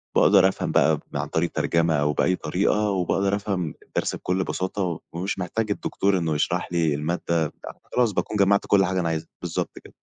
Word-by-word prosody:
باقدر 95 -1 +6
أفهم 95 - -2
بقى - - +4
ب - - -3
عن - - -2
طريق 85 +1 0
الترجمة 85 -1 +1
أو 75 0 +1
بأي 90 +6 +2
طريقة، 105 +4 0
وباقدر 95 +1 +1
أفهم 95 -6 -2
الدرس - - -2
بكل 90 +1 -1
بساطة، 95 -3 -2
ومش 90 +4 -3
محتاج 105 +4 -2
الدكتور 100 -1 0
إنه 80 -3 0
يشرح 75 - -1
لي 80 -3 +2
المادة 80 +5 -3 0.2
آآ، 75 - -5 0.4
خلاص 120 -3 +3
باكون 105 +2 -2
جمَّعت 100 0 +3
كل 95 -1 +4
حاجة 95 0 -1
أنا 85 -2 0
عايزها. 80 0 -3
بالضبط - - -3
كده. - - -15
90 Hz, 190 wpm, -24 LUFS, 85-100 Hz, 0.4 s, باقدر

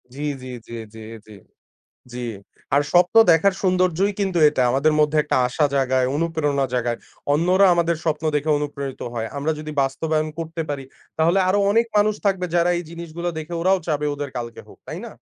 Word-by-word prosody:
জি, 145 - -7 0.2
জি, 130 - -9 0.2
জি, 120 - -10 0.2
জি, - - -10 0.3
জি, - - -14 0.8
জি 125 - -7 0.6
আর 145 - +4
স্বপ্ন 180 +5 +3
দেখার 185 +4 +4
সৌন্দর্যই 185 +1 +2
কিন্তু 190 -3 0
এটা 140 -4 0
আমাদের 140 +4 +2
মধ্যে 150 +1 +2
একটা 150 - -1
আশা 150 +4 0
জাগায়, 130 -1 +2
অনুপ্রেরণা 150 -4 0
জাগায়। 120 -1 -1 0.3
অন্যরা 180 +6 +4
আমাদের 170 -1 +1
স্বপ্ন 155 -1 -1
দেখে 150 +1 0
অনুপ্রেরিত 140 -2 -5
হয় 115 -1 -3
আমরা 145 +3 0
যদি 155 0 -6
বাস্তবায়ন 155 +3 -1
করতে 165 0 -4
পারি 140 -2 -4 0.3
তাহলে 170 +4 +3
আরো 200 - +3
অনেক 230 +2 +3
মানুষ 210 +1 +3
থাকবে 185 -2 +1
যারা 175 +1 +3
এই - - -4
জিনিসগুলো 170 +1 -5
দেখে 165 +2 -6
ওরাও 190 +2 +3
চাবে 150 -2 -1
ওদের 145 -1 -5
কালকে 120 -1 -6
হোক - - -16
তাই - - -5
না? - - -8
155 Hz, 180 wpm, -22 LUFS, 140-175 Hz, 0.8 s, আর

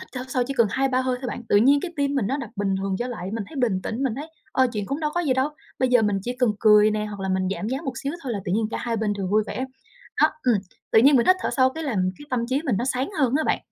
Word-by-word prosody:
hít 370 - -11
thở 250 0 -4
sâu 255 -1 0
chỉ 275 - -3
cần 235 -4 +4
2-3 265 -1 +1
hơi 255 -1 0
thôi 260 - -4
bạn, 240 - -5
tự - - +4
nhiên 275 +7 +5
cái 350 +1 -5
tim 285 -1 0
mình 255 -8 +1
nó 265 +6 0
đập 235 -6 -6
bình 195 -1 0
thường 195 0 -2
trở 245 - -2
lại, 190 -6 -5
mình 225 -2 -3
thấy 315 - -11
bình 220 -8 0
tĩnh, 230 +7 -3
mình 260 -5 0
thấy, 300 +4 -7 0.2
ơ, 260 - +4
chuyện 210 -3 -3
cũng 275 +7 -3
đâu 300 -1 0
có 350 - +1
gì 300 -7 +1
đâu, 260 +2 +1 0.3
bây 260 - +2
giờ 245 -2 +4
mình 205 -2 +1
chỉ 245 +4 -4
cần 250 -3 +3
cười 210 -1 +6
nè 210 0 -1
hoặc 205 -2 -7
là 190 - -3
mình 185 0 0
giảm 210 - -4
giá 260 +2 -1
một 270 - -2
xíu 280 - -2
thôi 260 -3 -3
là 210 - -2
tự 180 - -2
nhiên 215 +2 +1
cả - - -3
hai 235 -1 -2
bên 215 -1 0
đều 200 -2 -3
vui 210 +3 +2
vẻ. 260 - -3 0.6
Đó, 310 - +7 0.2
ừm, 245 -2 +4 0.4
tự - - +7
nhiên 275 +4 +6
mình 235 - +3
hít 370 - +6
thở - - -1
sâu 260 -1 +4
cái 320 +4 -6
làm 190 -10 0
cái 290 - -12
tâm 240 -2 0
trí 270 +3 0
mình 250 -9 +1
nó 240 - -1
sáng 260 +3 -1
hơn 265 -3 +2
á 315 - 0
bạn. - - +1
245 Hz, 335 wpm, -24 LUFS, 210-270 Hz, 0.6 s, Đó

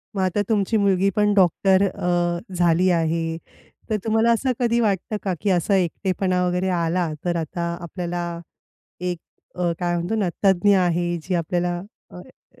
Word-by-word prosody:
मग 195 - 0
आता 185 +3 +1
तुमची 215 +1 +1
मुलगी 195 -1 +2
पण 210 -1 +3
डॉक्टर 190 0 +3
अ, 175 -1 -1 0.2
झाली 175 +1 +3
आहे. 165 -1 0 0.5
तर 215 - +1
तुम्हाला 225 +1 +3
असं 255 +3 +1
कधी 235 -1 +2
वाटतं 210 -1 0
का 190 -2 -1
की 205 - 0
असा 180 +2 +2
एकटेपणा 185 0 0
वगैरे 180 +1 0
आला 170 +1 0 0.2
तर 175 -1 0
आता 165 +1 -4 0.2
आपल्याला 175 0 -4 0.8
एक 180 -1 -2 0.4
अ, 175 -1 0
काय 175 -1 -1
म्हणतो 175 +5 -2
ना 210 -4 +1 0.2
तज्ञ 195 +1 +4
आहे 175 -1 +1
जी 185 +2 -3
आपल्याला 175 +1 -1 0.3
अ, - - -12
अ - - -16
180 Hz, 160 wpm, -22 LUFS, 175-200 Hz, 0.8 s, तज्ञ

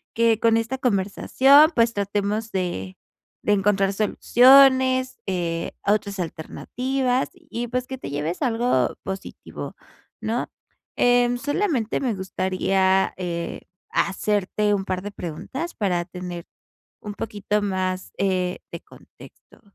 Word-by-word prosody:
que 230 -1 +3
con 230 0 +4
esta 235 +4 -2
conversación, 265 - +4
pues 230 0 +3
tratemos 205 +2 -2
de 175 - -3 0.5
de 210 - +2
encontrar 195 0 +2
soluciones, 260 +4 +5
eh, 170 -3 -2 0.2
otras 205 -1 0
alternativas 250 - -2
y 240 -9 -6
pues, 250 +1 -2
que 265 - -6
te - - -7
lleves 150 +5 -3
algo 230 - +1
positivo, 190 0 -7 0.4
¿no?, 230 +3 -2 0.5
eh, 245 0 +4
solamente 290 - -1
me 245 -5 0
gustaría, 190 0 +1
eh, 170 -2 -4 0.3
hacerte 205 +1 0
un 195 -1 0
par 185 -1 -3
de 205 +1 -6
preguntas 260 - -6
para 180 -5 0
tener 180 -1 -7 0.6
un 205 -1 -7
poquito 210 -1 -2
más, 185 -2 -2
eh, 185 -2 0
de - - -7
contexto, - - -17
205 Hz, 120 wpm, -23 LUFS, 185-245 Hz, 0.6 s, soluciones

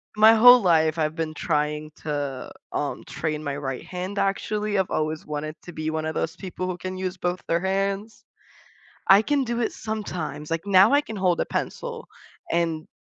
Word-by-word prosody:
I - - -10
my 220 +1 +9
whole 245 +2 +9
life, 160 -3 +3
I've 155 +1 0
been 160 -2 -3
trying 150 -1 -1
to, 145 -3 -3 0.2
um, - - -3
train 155 -1 -3
my 140 -1 -3
right 135 -3 -4
hand, 185 +3 -5
actually, 205 +1 0
I've 190 - 0
always 155 0 -1
wanted 150 +1 -4
to 175 - -9
be 155 0 -3
one 155 0 -2
of 160 - -2
those 165 +2 -2
people 185 -1 -5
who 180 -1 -3
can 185 0 -5
use 185 0 -3
both 180 +1 -2
their 170 +1 +2
hands. 195 +3 -2 0.8
I 195 +2 +8
can 285 +3 +1
do 235 -1 -2
it - - -1
sometimes, 175 -9 -5
like, 165 +3 -2
now 200 +5 +6
I 285 - +5
can 225 -7 -8
hold 180 -2 +2
a - - 0
pencil, - - -4 0.4
and 165 -2 0
180 Hz, 195 wpm, -25 LUFS, 155-200 Hz, 0.8 s, my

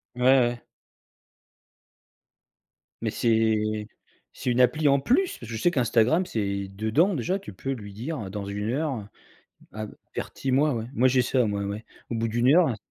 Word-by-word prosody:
Ouais, 125 - -6
ouais. 120 -2 +4 2.4
Mais - - -1
c'est 110 -2 +1 0.5
c'est 125 - -2
une 125 +1 +3
appli 145 +5 +3
en 140 0 +5
plus? 345 - +1
Parce 115 - -10
que 115 - -4
je - - -6
sais 175 - +3
qu'Instagram 125 +5 +2
c'est 100 - -2
dedans 110 - +1
déjà, 180 - -1
tu 145 - -10
peux 135 +9 -4
lui 105 -6 -6
dire, 135 +9 -5
heu, 100 - -5
dans 100 +1 -5
1 105 +2 -3
heure, 135 -7 -2 0.7
heu, 110 0 -7 0.2
avertis-moi, 135 +3 0
ouais. 115 -2 -3
Moi, 130 -1 +4
j'ai 130 0 +3
ça, 125 +1 +2
ouais, 100 +1 -3 0.2
au 120 - -2
bout 115 0 0
d'1 120 +4 +3
heure, 175 0 +6
in 120 - -1
120 Hz, 170 wpm, -26 LUFS, 110-135 Hz, 2.4 s, heure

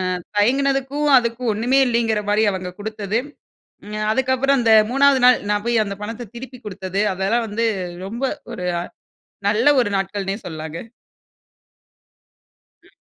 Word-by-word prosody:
ஆ - - -3 0.2
தயங்கினதுக்கும் 275 +5 +1
அதுக்கும் 235 -1 0
ஒண்ணுமே 245 +6 +2
இல்லேங்கிறமாரி 220 -2 +1
அவுங்க 185 -1 -5
கொடுத்தது. 215 0 -2 0.7
ம் 215 0 -3
அதுக்கப்பறம் 265 +2 +2
அந்த 230 -1 +3 0.2
மூணாவது 275 0 +4
நாள் 250 -1 +7
நான் 205 0 0
போய் 235 -2 +2
அந்த 200 -1 -5
பணத்த 225 +1 -6
திருப்பிக் 250 -1 -10
குடுத்தது, 195 -1 -3
அதெல்லாம் 200 +5 0
வந்து 225 +2 -1 0.4
ரொம்ப 230 +7 -6 0.3
ஒரு 180 -6 -5 0.8
நல்ல 235 +8 +4
ஒரு 230 - -1
நாட்கள்னே 195 0 -3
சொல்லலாங்க. 160 -1 -6 2.1
ம். - - -22
225 Hz, 125 wpm, -21 LUFS, 205-250 Hz, 2.1 s, நாள்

